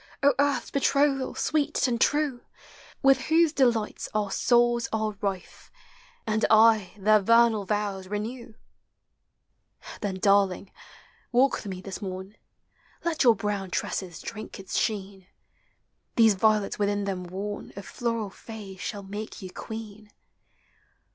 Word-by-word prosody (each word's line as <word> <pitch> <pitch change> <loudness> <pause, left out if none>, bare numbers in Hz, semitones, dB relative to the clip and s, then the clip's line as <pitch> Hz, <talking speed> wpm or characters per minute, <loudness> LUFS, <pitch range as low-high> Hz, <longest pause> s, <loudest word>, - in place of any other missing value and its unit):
O 285 0 +6
Earth's 285 0 +1
betrothal, 275 -1 +1
sweet 300 -3 0
and 235 -2 -1
true, 290 -4 +1 0.6
With 270 -1 +5
whose 320 0 +4
delights 235 -7 +1
our 205 -2 0
souls 240 +1 +3
are 215 -1 -1
rife. 195 -3 -5 0.5
And 220 -1 0
aye 220 -3 +5
their 215 +2 +4
vernal 230 0 +4
vows 200 -2 -2
renew! 220 +3 -5 1.5
Then, 200 -3 -2
darling, 195 0 +2 0.6
walk 260 +2 +4
with - - -8
me 185 -2 -5
this 190 +1 -7
morn: 190 +1 -6 0.7
Let 325 -3 +1
your 235 -3 +6
brown 200 -1 -3
tresses 180 -1 -3
drink 215 -2 -8
its 195 - -6
sheen; 195 -3 -2 0.9
These 225 -2 +6
violets, 210 +1 +1
within 205 0 0
them 190 -2 -3
worn. 200 +3 -6
Of 200 - -8
floral 230 -4 -3
fays 200 -3 -10
shall 200 +1 -5
make 205 +3 -7
yen 185 -2 -8
queen. 215 -1 -8
215 Hz, 130 wpm, -27 LUFS, 195-235 Hz, 1.5 s, O